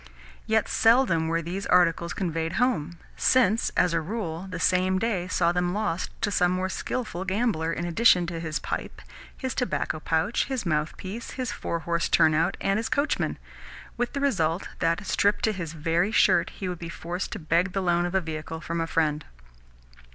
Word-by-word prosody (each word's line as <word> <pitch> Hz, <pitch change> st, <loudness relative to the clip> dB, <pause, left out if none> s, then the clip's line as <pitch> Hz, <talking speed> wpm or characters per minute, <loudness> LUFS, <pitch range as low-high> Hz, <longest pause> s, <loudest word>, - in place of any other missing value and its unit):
Yet 220 Hz, 0 st, +2 dB
seldom 225 Hz, -9 st, +3 dB
were 165 Hz, +1 st, 0 dB
these 185 Hz, +5 st, -4 dB
articles 170 Hz, -1 st, +3 dB
conveyed 165 Hz, -3 st, -2 dB
home, 175 Hz, -9 st, 0 dB, 0.2 s
since, 230 Hz, -4 st, +3 dB
as 175 Hz, -, +3 dB
a 165 Hz, -, +1 dB
rule, 180 Hz, -1 st, -4 dB
the 180 Hz, -2 st, -5 dB
same 185 Hz, +2 st, +2 dB
day 190 Hz, -4 st, -1 dB
saw 170 Hz, -2 st, +2 dB
them 180 Hz, +1 st, 0 dB
lost 205 Hz, -5 st, -1 dB
to 205 Hz, -, +1 dB
some 180 Hz, -2 st, +3 dB
more 185 Hz, +1 st, -1 dB
skilful 190 Hz, -3 st, -3 dB
gambler, 190 Hz, -4 st, 0 dB
in 170 Hz, +1 st, -3 dB
addition 180 Hz, 0 st, +4 dB
to 170 Hz, -1 st, -4 dB
his 160 Hz, -2 st, -3 dB
pipe, -, -, -5 dB, 0.3 s
his 260 Hz, -3 st, -3 dB
tobacco 250 Hz, -10 st, -1 dB
pouch, 165 Hz, +8 st, 0 dB
his 260 Hz, -6 st, -3 dB
mouthpiece, 175 Hz, +7 st, -3 dB
his 255 Hz, -2 st, -2 dB
four 170 Hz, -, -3 dB
horsed 170 Hz, 0 st, -1 dB
turn 155 Hz, -, +5 dB
out, 160 Hz, +2 st, +1 dB
and 195 Hz, +1 st, +1 dB
his 225 Hz, -, -3 dB
coachman: 285 Hz, +2 st, 0 dB, 0.6 s
with 245 Hz, 0 st, -2 dB
the 280 Hz, -, -2 dB
result 175 Hz, -, 0 dB
that, 165 Hz, +3 st, 0 dB
stripped 205 Hz, +1 st, +1 dB
to 220 Hz, -, +3 dB
his 170 Hz, -6 st, -5 dB
very 165 Hz, +5 st, 0 dB
shirt, 170 Hz, -, +4 dB
he 190 Hz, -, -6 dB
would 180 Hz, -2 st, -4 dB
be 170 Hz, -, -6 dB
forced 175 Hz, +2 st, -5 dB
to -, -, -4 dB
beg 170 Hz, +2 st, +1 dB
the 195 Hz, -, 0 dB
loan 175 Hz, 0 st, +2 dB
of 175 Hz, -, -5 dB
a 190 Hz, -, +3 dB
vehicle 160 Hz, 0 st, -5 dB
from 170 Hz, +1 st, -3 dB
a 165 Hz, -, -1 dB
friend. 155 Hz, -2 st, 0 dB
180 Hz, 190 wpm, -26 LUFS, 165-205 Hz, 0.6 s, turn